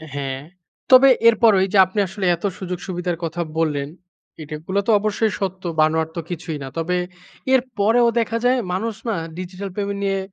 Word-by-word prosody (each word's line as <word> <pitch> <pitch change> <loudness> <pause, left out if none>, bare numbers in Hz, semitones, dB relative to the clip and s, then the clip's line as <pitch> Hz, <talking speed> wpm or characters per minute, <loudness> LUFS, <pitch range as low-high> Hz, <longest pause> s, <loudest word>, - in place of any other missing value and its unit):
হ্যাঁ, 135 -2 -3 0.5
তবে 260 +1 +9 0.2
এরপর 230 0 +5
ওই 190 - +3
যে - - +4
আপনি 190 +3 -4
আসলে 190 +1 -4
এত 170 - -20
সুযোগ-সুবিধার 180 -1 -4
কথা 165 +1 -3 0.2
বললেন, 145 -3 0 0.5
এটা 155 0 -8
এগুলা 185 +6 -2
তো - - +4
অবশ্যই 215 +1 0
সত্য 190 -1 -3 0.2
বানোয়াট 160 +1 +2
তো 170 - -2
কিছুই 165 -2 -5
না। - - -6
তবে 180 +2 0 0.6
এরপরেও 240 -2 +2
দেখা 230 0 -1
যায় 255 +1 +4 0.2
মানুষ 220 +4 -2
না 225 - 0 0.2
ডিজিটাল 185 +2 -6
পেমেন্ট 200 -1 -3
নিয়ে 195 -1 0
190 Hz, 170 wpm, -21 LUFS, 165-215 Hz, 0.6 s, তবে